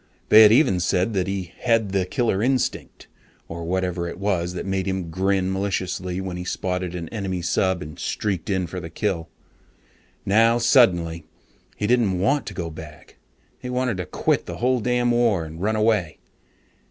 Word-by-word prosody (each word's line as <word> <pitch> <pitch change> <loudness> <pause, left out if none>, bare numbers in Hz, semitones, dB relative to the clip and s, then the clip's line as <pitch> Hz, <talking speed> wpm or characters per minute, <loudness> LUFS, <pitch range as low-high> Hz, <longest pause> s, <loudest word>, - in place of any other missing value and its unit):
They 110 - +9
had 105 -1 +8
even 110 - +4
said 95 +4 0
that 95 -2 0
"he 95 -3 -4
had 115 -4 +1
the 95 -2 0
killer 115 -4 0
instinct" 130 +1 -1 0.4
or 85 +1 -6
whatever 90 0 -2
it - - -8
was 90 -3 -1
that 90 - -5
made 95 -1 -2
him 95 -3 -3
grin 95 +1 0
maliciously 95 -2 -2
when 95 -2 -4
he 90 - -5
spotted 90 0 -3
an 85 -2 -5
enemy 95 -5 -4
sub 95 0 0
and 75 -1 -10
streaked 100 -4 -3
in 95 -2 0
for 90 +2 -6
the 85 -2 -7
kill. 85 -4 -2 1.0
Now 115 +4 +4
suddenly 85 - +3 0.5
he 105 - -2
didn't 110 -5 +2
want 140 +10 +1
to - - -6
go 85 -3 -4
back. 75 -1 -12 0.4
He 125 - -7
wanted 125 -4 -1
to 90 -1 -4
quit - - 0
the - - -6
whole 125 +1 +1
damn 120 +1 +1
war 115 -8 +2
and 80 +2 -9
run 110 +3 0
away. 105 -7 +1
95 Hz, 180 wpm, -23 LUFS, 90-110 Hz, 1.0 s, They